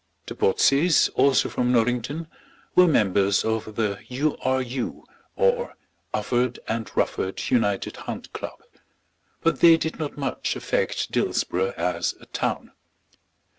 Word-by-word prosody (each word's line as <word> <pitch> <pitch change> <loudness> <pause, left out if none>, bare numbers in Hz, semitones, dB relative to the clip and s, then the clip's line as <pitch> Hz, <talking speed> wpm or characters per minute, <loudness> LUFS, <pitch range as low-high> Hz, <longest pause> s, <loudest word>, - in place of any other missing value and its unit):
The - - -6
Botseys, 145 - +3
also 135 0 +3
from 125 0 0
Norrington, 125 +7 0 0.5
were 180 0 +6
members 100 - +2
of 110 -1 -2
the 105 -3 -1
U. 140 +5 -1
R. 130 0 +2
U., 125 0 -4 0.3
or 485 0 +1 0.4
Ufford 125 0 0
and 110 -1 -2
Rufford 95 - -1
United 105 -6 +1
Hunt - - -7
Club; - - -7 0.8
but 165 - +1
they 165 -1 +7
did 160 0 -4
not 150 -2 -4
much 135 -2 -2
affect - - -1
Dillsborough 95 +2 0
as 85 -1 -1
a - - -15
town. - - -3
125 Hz, 130 wpm, -24 LUFS, 110-150 Hz, 0.8 s, they